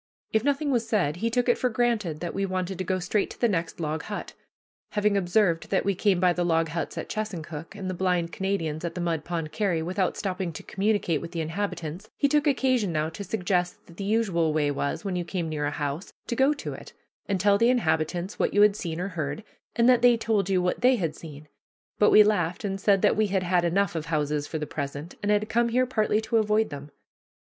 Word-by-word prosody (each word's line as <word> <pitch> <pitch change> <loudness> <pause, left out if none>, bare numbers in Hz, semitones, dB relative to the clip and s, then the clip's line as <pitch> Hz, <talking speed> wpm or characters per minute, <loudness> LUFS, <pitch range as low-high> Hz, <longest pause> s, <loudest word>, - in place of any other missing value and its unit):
If 220 0 +2
nothing 285 +1 +1
was 235 -3 0
said, 175 -9 +1
he 230 +5 0
took 245 +1 0
it 240 - +3
for 250 - +1
granted 220 -9 0
that 175 - -3
we 195 - -1
wanted 185 -1 -2
to - - 0
go 185 +1 0
straight 185 +3 0
to - - -11
the 240 - +3
next 175 -6 -2
log 155 -1 -2
hut. 205 +5 -6 0.6
Having 210 -1 +2
observed 180 -2 +1
that 195 - +1
we 200 - +2
came 190 -1 +2
by 180 -1 +4
the 175 - -1
log 165 -1 +1
huts 165 +2 -4
at - - -4
Chesuncook, 170 -6 -5
and 195 -2 -5
the 185 - -2
blind 180 -2 0
Canadian's 175 -6 -2
at 170 - -4
the - - -4
Mud 165 -3 -1
Pond 165 -2 -4
carry, 185 -7 0
without 185 +2 -1
stopping 185 -3 -2
to - - -8
communicate 195 -6 0
with 170 +1 -8
the 170 - -3
inhabitants, 170 +2 -4
he 285 - +3
took 295 +1 +2
occasion 255 -8 +2
now 155 0 0
to 180 +5 -7
suggest 180 -2 -1
that 170 - -16
the 200 - -4
usual 195 -6 +1
way 150 -2 +1
was, 140 +7 -3
when 190 -2 -2
you 175 - -1
came 175 -1 -3
near 150 -2 -2
a - - +1
house, 145 +4 -4
to 235 - -3
go 265 +4 +4
to 295 - -4
it, - - -11 0.3
and 195 -2 0
tell 200 +2 +4
the 230 +1 +4
inhabitants 175 -4 0
what - - 0
you 205 - +7
had 210 -1 +5
seen 170 -5 -4
or 185 +2 -2
heard, 160 +1 -4 0.3
and 235 0 +4
then 250 -2 +5
they 245 -1 +6
told 215 -4 0
you 185 -2 +2
what 180 - -1
they 255 +1 +5
had 165 -8 -2
seen; 150 -2 -11 0.5
but 210 - +6
we 215 - +8
laughed 180 -5 0
and 195 -1 -3
said 200 -1 +3
that - - +4
we 215 0 +2
had 190 -1 0
had 180 -1 +2
enough 180 +2 +1
of 160 -1 -4
houses 150 -2 -1
for 160 - -4
the 150 - -3
present, 145 +3 -5
and 205 0 +1
had 210 +1 +2
come 235 +2 +2
here 250 +2 +2
partly 215 -4 +1
to 220 +1 0
avoid 215 0 +2
them. 145 0 -7
185 Hz, 240 wpm, -26 LUFS, 165-215 Hz, 0.6 s, we